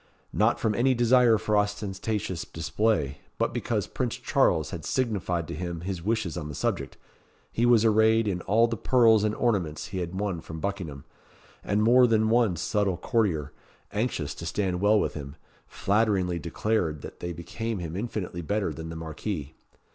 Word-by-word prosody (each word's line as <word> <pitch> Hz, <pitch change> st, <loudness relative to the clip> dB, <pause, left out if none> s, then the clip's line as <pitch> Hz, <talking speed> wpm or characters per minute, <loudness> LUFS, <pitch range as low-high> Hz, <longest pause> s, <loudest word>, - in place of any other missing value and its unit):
Not -, -, +2 dB
from 110 Hz, -, +1 dB
any 125 Hz, +4 st, +2 dB
desire 120 Hz, -1 st, +5 dB
for 105 Hz, 0 st, 0 dB
ostentatious 105 Hz, -2 st, -1 dB
display, 80 Hz, -4 st, -1 dB, 0.2 s
but -, -, 0 dB
because -, -, -1 dB
Prince -, -, -3 dB
Charles -, -, +1 dB
had -, -, -6 dB
signified 95 Hz, -9 st, -1 dB
to -, -, -5 dB
him 85 Hz, 0 st, -4 dB
his 90 Hz, -1 st, -4 dB
wishes 105 Hz, -3 st, -1 dB
on 75 Hz, -3 st, -5 dB
the 75 Hz, -, -6 dB
subject, -, -, -2 dB, 0.5 s
he 120 Hz, +1 st, +1 dB
was 115 Hz, -2 st, +5 dB
arrayed 110 Hz, 0 st, +4 dB
in 90 Hz, -3 st, -1 dB
all 115 Hz, +3 st, +5 dB
the 115 Hz, -1 st, -1 dB
pearls 115 Hz, -2 st, +4 dB
and 105 Hz, 0 st, 0 dB
ornaments 95 Hz, -11 st, -1 dB
he 95 Hz, -, -4 dB
had 90 Hz, +2 st, -4 dB
won 100 Hz, -5 st, -2 dB
from 80 Hz, 0 st, -8 dB
Buckingham; 85 Hz, -8 st, -4 dB, 0.6 s
and 105 Hz, +1 st, +1 dB
more 125 Hz, +2 st, +6 dB
than 110 Hz, -1 st, +2 dB
one 115 Hz, -6 st, +3 dB
subtle 95 Hz, +2 st, 0 dB
courtier, 90 Hz, -, 0 dB, 0.4 s
anxious 105 Hz, -, -2 dB
to 85 Hz, -, -7 dB
stand 95 Hz, -1 st, -1 dB
well 105 Hz, +1 st, +5 dB
with -, -, -1 dB
him, 70 Hz, -1 st, -7 dB, 0.3 s
flatteringly 100 Hz, -4 st, +1 dB
declared 85 Hz, -2 st, -1 dB
that -, -, -9 dB
they 85 Hz, -, -4 dB
became 110 Hz, +7 st, -4 dB
him 85 Hz, -2 st, -5 dB
infinitely 100 Hz, -4 st, -4 dB
better 100 Hz, 0 st, -1 dB
than 80 Hz, +2 st, -7 dB
the 80 Hz, -, -6 dB
Marquis. 80 Hz, -1 st, -5 dB
100 Hz, 170 wpm, -27 LUFS, 85-110 Hz, 0.6 s, more